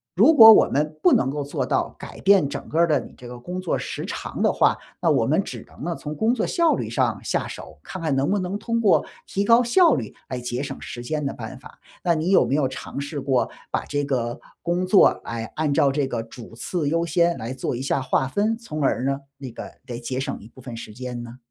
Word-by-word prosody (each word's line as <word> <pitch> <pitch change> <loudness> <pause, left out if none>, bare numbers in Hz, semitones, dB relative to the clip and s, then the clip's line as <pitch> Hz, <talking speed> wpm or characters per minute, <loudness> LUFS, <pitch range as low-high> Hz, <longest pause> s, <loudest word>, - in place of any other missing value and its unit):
如 240 - +6
果 225 -6 +11
我 - - +5
们 150 +2 -1
不 - - +6
能 135 - +3
够 145 +1 -3
做 140 - -3
到 - - -1
改 - - -10
变 195 -6 +5
整 140 - -7
个 160 - -1
儿 170 - +5
的 150 -3 +3
你 - - -12
这 125 - -11
个 125 0 -8
工 180 +10 -6
作 185 -2 -1
时 - - -5
长 - - -5
的 - - +3
话， - - +3 0.2
那 - - +3
我 - - +2
们 - - +2
只 - - -8
能 - - -13
呢 170 +2 -1
从 150 0 -6
工 220 +9 +2
作 240 - -1
效 335 -1 +3
率 - - -4
上 - - 0
下 - - 0
手， - - -9
看 185 - -7
看 155 -4 0
能 135 +5 +1
不 205 - +2
能 185 +2 -3
通 230 +2 -1
过 215 -4 +3 0.2
提 200 - -1
高 230 +3 +6
效 325 +9 +4
率 115 -6 -5
来 130 - -3
节 125 +2 -3
省 - - -6
时 120 - -7
间 150 +3 -2
的 135 - -2
办 - - -8
法。 - - -15 0.3
那 170 -1 +3
你 160 +3 -1
有 195 - +5
没 135 - 0
有 140 -3 +1
尝 130 +1 -6
试 145 +1 -5
过 135 -2 +1 0.2
把 - - -1
这 145 0 -2
个 120 -3 -2 0.2
工 175 +1 -1
作， 195 +1 +7 0.2
哎， 115 -1 -5
按 155 -2 0
照 140 0 +3
这 140 -1 0
个 120 -3 -3
主 115 0 -12
次 145 +7 -2
优 165 +3 +1
先 170 +1 +2
来 115 +3 -5
做 130 - -3
一 120 - -4
下 135 0 0
划 130 0 0
分， 215 +8 0
从 155 -10 -6
而 135 -2 +1
呢， 135 +1 0 0.2
那 135 -3 -8
个 - - -9
得 120 -3 -6
节 130 +2 -3
省 - - -4
一 105 - -13
部 130 - -16
分 120 -2 -8
时 110 -2 -9
间 125 +1 -6
呢？ 120 +1 -10
145 Hz, 275 characters per minute, -23 LUFS, 130-180 Hz, 0.3 s, 果